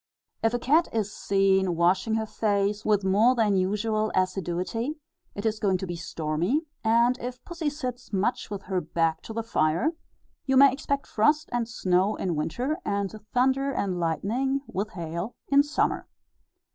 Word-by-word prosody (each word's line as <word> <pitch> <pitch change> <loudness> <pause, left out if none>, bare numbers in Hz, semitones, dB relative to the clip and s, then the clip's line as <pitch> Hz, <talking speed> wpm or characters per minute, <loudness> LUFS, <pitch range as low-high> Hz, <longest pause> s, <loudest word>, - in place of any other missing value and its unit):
If 225 +1 +2
a - - +2
cat 300 +8 +3
is 210 -2 -2
seen 190 -2 +2
washing 185 +6 +2
her 220 0 0
face 205 -1 0
with 205 -2 +2
more 210 +7 +4
than 215 -4 +2
usual 215 +3 0
assiduity, 185 - -1 0.4
it 200 - -5
is 220 -1 0
going 195 -3 +2
to 190 - -5
be 175 -1 -4
stormy; 165 - -1 0.2
and 235 +2 +3
if 250 +1 -7
pussy 335 -3 -2
sits 255 -4 -6
much 205 +5 -1
with 200 -2 -5
her 185 -1 -1
back 165 0 0
to - - -9
the 230 0 -2
fire, 195 - +1 0.6
you 265 0 +3
may 275 -1 +7
expect 280 0 -2
frost 300 +8 +2
and 240 -1 -1
snow 190 -1 +1
in 180 -3 -2
winter, 250 - -2
and 200 -1 -1 0.2
thunder 265 +2 +2
and 190 -8 -2
lightning, 230 - 0
with 200 +4 -3
hail, 170 +4 -5
in 280 0 +6
summer. 295 +1 -1
210 Hz, 165 wpm, -26 LUFS, 185-250 Hz, 0.6 s, may